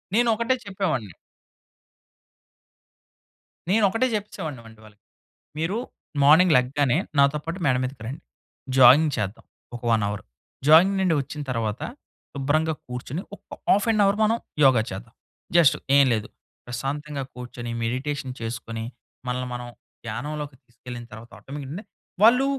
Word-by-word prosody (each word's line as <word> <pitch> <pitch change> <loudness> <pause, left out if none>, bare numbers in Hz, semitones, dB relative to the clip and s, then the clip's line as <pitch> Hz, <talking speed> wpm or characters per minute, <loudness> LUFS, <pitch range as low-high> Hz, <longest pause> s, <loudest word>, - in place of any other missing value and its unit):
నేనొకటే 235 +1 +3
చెప్పేవాడిని 180 - -2 2.6
నేనొకటే 215 +4 +3
చెప్పేసేవాడిని 160 - -5
వండి 110 -1 -15
వాళ్ళకి. 105 -1 -18 0.6
మీరు 165 +7 -1 0.5
మార్నింగ్ 160 +4 +7
లెగ్గానే, 130 +1 +2 0.2
నాతో 140 +2 +4
పాటు 165 +4 -5
మేడ 130 -3 +4
మీదకి 130 -2 -5
రండి. 135 +5 -6 0.6
జాగింగ్ 135 +5 +7
చేద్దాం, 105 0 -4 0.3
ఒక 120 - -8
1 110 -2 +3
అవర్. 105 0 -4 0.4
జాగింగ్ 170 +6 +7
నుండి 185 -3 +3
ఒచ్చిన 150 +2 -7
తర్వాత, 115 -3 -2 0.5
శుభ్రంగా 155 +3 +1
కూర్చొని 125 +6 -5
ఒక్క - - -27 0.2
హాఫ్ 205 +4 +4
ఎన్ 215 -2 +2
అవర్ 200 +1 +2
మనం 225 +2 +3 0.3
యోగా 130 -4 +6
చేద్దాం. 110 +4 -8 0.4
జస్ట్ 170 -5 +6 0.2
ఏం 140 - +7
లేదు. 110 -2 -2 0.4
ప్రశాంతంగా 140 +4 -4
కూర్చొని, 120 -1 -7
మెడిటేషన్ 130 +3 -2
చేసుకొని, 115 0 -5 0.4
మనల్ని 125 0 -2
మనం 125 0 -5 0.4
ధ్యానంలోకి 145 +5 -5
తీసుకెళ్ళిన 120 0 -10
తర్వాత 115 +2 -11
ఆటోమేటిక్‌గా 145 +7 -7 0.4
వాళ్ళు 245 +5 +6
140 Hz, 120 wpm, -24 LUFS, 120-165 Hz, 2.6 s, మార్నింగ్